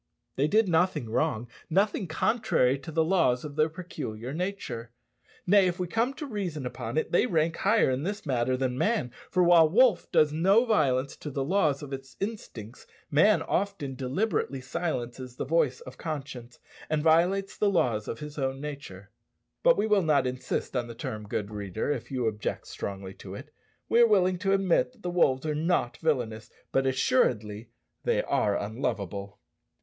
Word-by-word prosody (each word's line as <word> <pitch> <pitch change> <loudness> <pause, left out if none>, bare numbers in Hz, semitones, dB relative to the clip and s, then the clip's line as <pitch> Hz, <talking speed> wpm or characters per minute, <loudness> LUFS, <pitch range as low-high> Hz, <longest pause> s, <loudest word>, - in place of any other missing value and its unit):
They 140 +3 +2
did 215 +5 +3
nothing 165 -9 +1
wrong 120 -3 0 0.2
nothing 195 +2 +1
contrary 160 - +1
to 140 +4 -8
the 160 +1 +2
laws 160 -7 +2
of 145 -1 -7
their 155 +1 +3
peculiar 130 -8 -6
nature. 175 - -4 0.6
Nay, 195 0 +5
if 175 0 -2
we 180 - 0
come 230 +9 0
to 300 - -6
reason 185 - -4
upon 120 +1 -5
it, 155 - 0
they 175 - +3
rank 165 -4 +1
higher 210 -7 +3
in 130 +1 -1
this 200 +5 -4
matter 130 -2 0
than 130 -1 -1
man; 210 - +1 0.2
for 180 - +2
while 170 -2 +6
the 170 - -8
wolf 245 -6 +4
does 150 -1 +4
no 195 +9 +4
violence 140 - +1
to 150 - -7
the 140 -1 -2
laws 150 -3 +1
of 140 -1 -7
its 135 -1 -8
instincts, 125 - -6 0.2
man 185 +9 +4
often 195 -8 -2
deliberately 135 - -1
silences 130 -3 -4
the - - -4
voice 140 -3 +1
of 130 - -11
conscience, 135 -6 -6 0.3
and 155 -1 0
violates 175 +5 +3
the 210 - +2
laws 120 - +1
of 115 - -5
his 150 0 -7
own 135 0 -1
nature. 135 -10 -8 0.5
But - - +5
we - - +1
will 210 -2 +3
not 150 -6 +2
insist 125 +1 -3
on 120 -2 -1
the 115 - -8
term, 105 -2 -6
good 105 0 -3
reader, 105 +4 -3
if 120 -4 -4
you 130 -3 -2
object 110 -1 -2
strongly 95 -1 -6
to - - -8
it. - - -11 0.3
We 235 - +3
are 235 - +7
willing 185 -4 +3
to 195 0 +1
admit 195 +6 +2
that 235 - -24
the 180 - -2
wolves 135 -6 +2
are 155 - 0
not 155 -5 0
villanous, 115 -8 -1 0.2
but, 135 0 +2
assuredly, 115 -4 +1 0.3
they - - +1
are 100 -1 +1
unlovable. 100 -3 -4
150 Hz, 180 wpm, -28 LUFS, 125-180 Hz, 0.6 s, are